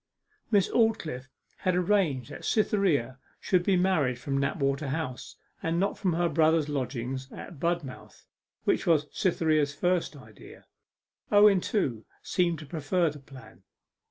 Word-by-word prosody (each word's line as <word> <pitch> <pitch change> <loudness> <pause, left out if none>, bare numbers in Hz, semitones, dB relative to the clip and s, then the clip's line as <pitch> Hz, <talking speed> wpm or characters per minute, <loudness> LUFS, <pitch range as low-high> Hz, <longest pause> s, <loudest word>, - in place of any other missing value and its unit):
Miss 200 -4 +3
Aldclyffe 195 - 0 0.3
had 185 -2 0
arranged 175 - +1
that - - -9
Cytherea 175 - +1 0.2
should 185 -2 +2
be 195 +1 +2
married 160 -9 +1
from 135 +2 -2
Knapwater 140 -1 -1
House, 135 -3 -4 0.3
and 165 +1 -1
not 195 - 0
from 185 -4 -1
her 175 +1 +1
brother's 160 -2 +2
lodgings 130 -2 -4
at 170 - -10
Budmouth, 170 -5 -4 0.4
which - - 0
was 155 -3 +3
Cytherea's 155 -5 +1
first 175 -3 0
idea. 110 -7 -14 0.7
Owen, 205 -2 +6
too, 130 - -1 0.2
seemed 175 -3 0
to 155 - -9
prefer 165 +2 0
the 145 - -11
plan. 135 -1 -15
160 Hz, 135 wpm, -28 LUFS, 135-180 Hz, 0.7 s, Owen